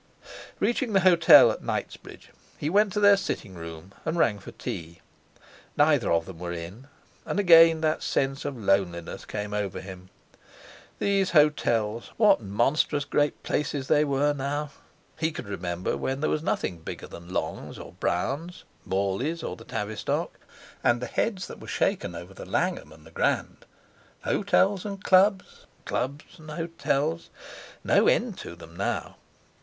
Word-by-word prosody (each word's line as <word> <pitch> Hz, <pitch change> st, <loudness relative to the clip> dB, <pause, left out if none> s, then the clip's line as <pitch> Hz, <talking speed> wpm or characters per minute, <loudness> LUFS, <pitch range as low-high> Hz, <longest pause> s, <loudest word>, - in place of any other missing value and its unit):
Reaching 240 Hz, -1 st, 0 dB
the 195 Hz, -, +4 dB
hotel 175 Hz, -3 st, +8 dB
at -, -, -6 dB
Knightsbridge -, -, -6 dB, 0.3 s
he 150 Hz, -, -2 dB
went 205 Hz, +1 st, +4 dB
to -, -, 0 dB
their 205 Hz, -1 st, +7 dB
sitting 110 Hz, -, -4 dB
room, 85 Hz, +2 st, -9 dB
and 160 Hz, +2 st, -2 dB
rang 105 Hz, -10 st, +2 dB
for -, -, -10 dB
tea. 85 Hz, 0 st, -7 dB, 0.8 s
Neither -, -, +3 dB
of 85 Hz, -1 st, +2 dB
them 90 Hz, -3 st, -10 dB
were 90 Hz, -1 st, -4 dB
in. 85 Hz, +10 st, -8 dB, 0.4 s
And -, -, -2 dB
again 165 Hz, -4 st, +7 dB
that 155 Hz, -1 st, +1 dB
sense 135 Hz, +1 st, -1 dB
of 135 Hz, -, -4 dB
loneliness 95 Hz, -5 st, -1 dB
came 105 Hz, 0 st, -5 dB
over 105 Hz, -3 st, -2 dB
him. 95 Hz, -1 st, -10 dB, 0.9 s
These 195 Hz, -2 st, +1 dB
hotels. 115 Hz, -7 st, +2 dB
What 210 Hz, -, +5 dB
monstrous 135 Hz, +8 st, +1 dB
great 145 Hz, 0 st, 0 dB
places 145 Hz, -2 st, -2 dB
they 150 Hz, -, +5 dB
were 145 Hz, 0 st, +1 dB
now! 145 Hz, +1 st, -3 dB, 0.5 s
He 160 Hz, +1 st, +1 dB
could 150 Hz, -, -7 dB
remember 90 Hz, -3 st, -3 dB
when 135 Hz, +1 st, -2 dB
there 155 Hz, -, 0 dB
was 155 Hz, -, 0 dB
nothing 90 Hz, -, -2 dB
bigger 80 Hz, -, -7 dB
than 85 Hz, +1 st, -11 dB
Long's -, -, -4 dB
or -, -, -10 dB
Brown's, 145 Hz, -, -2 dB, 0.2 s
Morley's 100 Hz, -, -1 dB
or -, -, -4 dB
the 115 Hz, -, -14 dB
Tavistock, 105 Hz, -1 st, -3 dB, 0.4 s
and 120 Hz, 0 st, +3 dB
the 125 Hz, -, -4 dB
heads 190 Hz, -, -1 dB
that -, -, -10 dB
were -, -, -11 dB
shaken 85 Hz, -, -1 dB
over 85 Hz, +3 st, -9 dB
the -, -, -10 dB
Langham 75 Hz, -, -1 dB
and 80 Hz, 0 st, -16 dB
the 80 Hz, -, -15 dB
Grand. -, -, -1 dB, 0.6 s
Hotels 200 Hz, -1 st, +2 dB
and 200 Hz, -1 st, -6 dB
Clubs—Clubs 185 Hz, -6 st, 0 dB
and 155 Hz, 0 st, -12 dB
Hotels; 165 Hz, -1 st, -2 dB, 0.5 s
no -, -, +4 dB
end 230 Hz, -5 st, +1 dB
to 85 Hz, -, -8 dB
them 85 Hz, 0 st, -14 dB
now! 100 Hz, -, -3 dB
135 Hz, 155 wpm, -26 LUFS, -, 0.9 s, hotel